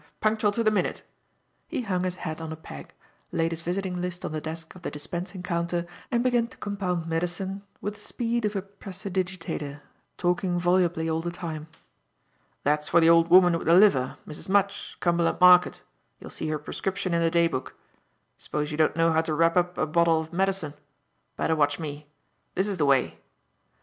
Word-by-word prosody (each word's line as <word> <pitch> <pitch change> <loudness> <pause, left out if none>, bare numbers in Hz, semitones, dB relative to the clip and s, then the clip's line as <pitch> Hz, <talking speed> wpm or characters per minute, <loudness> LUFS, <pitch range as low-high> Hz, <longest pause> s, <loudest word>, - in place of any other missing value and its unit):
Punctual 215 -1 +2
to 230 - 0
the 215 - +4
minute!" 210 - -1 0.6
He 280 -7 -3
hung 185 -4 -1
his 180 -1 -2
hat 160 -3 -5
on 160 -1 -5
a - - -4
peg, 70 - -11 0.4
laid 165 0 0
his 165 0 -4
visiting 180 +1 -2
list 180 0 -4
on - - -3
the 155 0 -3
desk 160 +1 -7
of 185 - -14
the - - -3
dispensing 175 +5 -6
counter 170 0 -1 0.2
and 240 -2 +1
began 240 -2 +2
to - - -16
compound 185 -5 -2
medicine 180 +4 -2 0.2
with 205 - -3
the 205 - -16
speed 235 +2 -2
of 210 0 -1
a 195 - -1
prestidigitateur, 185 -6 -5 0.4
talking 180 0 0
volubly 175 -2 +2
all 160 0 0
the 175 - -3
time. 160 -3 -6 1.0
"That's 150 +1 +1
for 170 - +5
the 165 0 +6
old 165 0 +5
woman 175 0 +7
with 165 - -4
the 165 - +6
liver, 185 -11 +4
Mrs. 150 +4 -8
Mudge, 200 0 0
Cumberland 170 -1 +1
Market, 180 0 +6 0.4
you'll - - -10
see 155 - -4
her 155 - 0
prescription 185 +4 -3
in 170 - +2
the 165 - +3
day 170 0 +3
book. 130 -6 -5 0.6
S'pose 150 0 -3
you 150 - -4
don't 155 -1 +3
know 165 0 +3
how 160 0 +3
to 160 -1 -2
wrap 165 +1 +3
up 180 0 +1
a - - +1
bottle 165 +1 +3
of 160 +1 -7
medicine. 190 -4 0 0.6
Better 160 - +1
watch 145 -2 +2
me. 150 -2 -6 0.5
This 190 +2 +1
is 200 -2 -2
the 145 - +3
way." 135 -2 +2
175 Hz, 195 wpm, -26 LUFS, 160-190 Hz, 1.0 s, woman